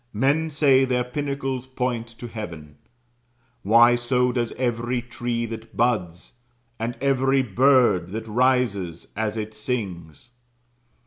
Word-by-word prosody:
Men 140 +8 +1
say 140 -3 +4
their 125 -1 +1
pinnacles 135 -1 -3
point 125 -3 -2
to 115 +1 -10
heaven. 85 -10 -8 0.8
Why, 115 +4 +6
so 125 +1 +1
does 120 -2 -1
every 120 0 -1
tree 120 0 -3
that 115 0 -9
buds, 90 -8 -1 0.5
and 115 +2 -3
every 135 0 +2
bird 120 -5 +3
that 110 +3 -5
rises 110 -8 0
as 110 +1 -2
it 110 0 -4
sings. 105 - -5
120 Hz, 120 wpm, -24 LUFS, 110-130 Hz, 0.8 s, Why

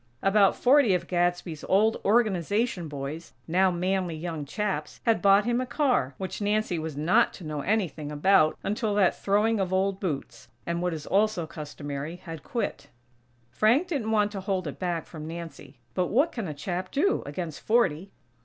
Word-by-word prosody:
About 195 0 +4
forty 255 -6 +4
of 175 -1 -2
Gadsby's 175 -2 -1
old 215 +4 +3
Organization 205 -3 +1
boys, 145 +3 -6
now 185 +3 +3
manly 180 -1 -1
young 160 -2 -5
chaps, 170 -2 -3
had 230 -2 +3
bought 200 0 +5
him 240 +1 +1
a - - -2
car, 250 - +1
which 190 +2 -5
Nancy 205 -4 0
was 155 -2 -5
not 155 +5 +3
to - - -11
know 155 -2 -4
anything 165 -7 -1
about 155 +1 +3
until 210 0 -1
that 195 -4 +3
throwing 210 +2 +1
of 185 -2 -1
old 190 +1 +1
boots, 150 - -4 0.2
and 170 0 -2
what 180 -2 -1
is 150 - -7
also 205 -3 +1
customary, 150 -1 -6
had 165 -3 -9
quit. 235 - -4 0.6
Frank 240 - +3
didn't 270 -10 -2
want 210 -2 +2
to 195 -2 -5
hold 190 -2 -2
it 145 - -6
back 175 -3 -2
from 155 -2 -9
Nancy, 165 -4 -8 0.2
but 180 -1 0
what 280 - +2
can 225 -6 -4
a 155 - -4
chap 180 +5 -4
do, 390 +8 +1
against 160 +1 -5
forty? 195 -6 +1
185 Hz, 175 wpm, -27 LUFS, 160-210 Hz, 0.6 s, bought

